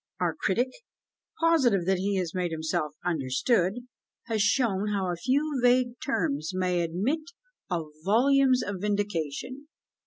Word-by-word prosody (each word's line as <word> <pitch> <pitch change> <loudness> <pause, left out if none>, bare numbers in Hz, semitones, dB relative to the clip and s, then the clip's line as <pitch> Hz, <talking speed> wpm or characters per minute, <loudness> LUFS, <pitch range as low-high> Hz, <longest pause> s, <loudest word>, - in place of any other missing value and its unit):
Our - - +1
critic, 245 -2 0 0.7
positive 265 - +3
that 190 0 +1
he 200 +1 0
has 180 -3 -2
made 180 -2 -1
himself 160 -1 -2
understood, 180 - +1 0.4
has 225 -2 -1
shown 205 -2 +2
how 195 -3 -1
a - - -2
few 275 - 0
vague 245 0 +3
terms 155 - -1
may 180 -1 +1
admit 195 - -1 0.5
of 165 -4 -2
volumes 255 +5 +4
of 205 -1 -4
vindication. 205 - -2
200 Hz, 130 wpm, -27 LUFS, 175-250 Hz, 0.7 s, volumes